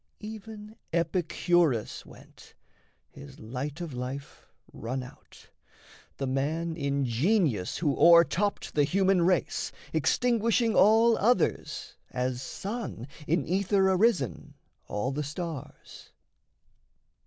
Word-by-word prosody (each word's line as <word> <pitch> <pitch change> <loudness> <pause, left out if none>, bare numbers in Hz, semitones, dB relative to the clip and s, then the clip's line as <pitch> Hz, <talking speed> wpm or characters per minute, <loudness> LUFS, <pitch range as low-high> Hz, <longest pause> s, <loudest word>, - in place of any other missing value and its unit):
Even 215 0 -9
Epicurus 170 - 0
went, - - -16 0.6
his 70 - -13
light 135 +8 -5
of 165 -5 -5
life 130 +3 -7 0.3
Run 130 +3 -4
out, 125 - -16 0.7
the 135 - -2
man 155 +5 -1
in 140 -3 -1
genius 130 - +1
who 145 -4 0
o'er 170 0 +8
topped 200 +4 -2
The 145 - +3
human 190 +4 +2
race, 180 0 0 0.2
extinguishing 230 - +2
all 225 +4 +5
others, 245 +5 0
As 125 0 -2
sun, 195 - -5 0.2
in 160 -2 +1
ether 190 +2 +2
arisen, 180 - +1 0.3
all 105 +6 -2
the 145 +2 -3
stars. 150 -1 -7
170 Hz, 105 wpm, -28 LUFS, 135-200 Hz, 0.7 s, o'er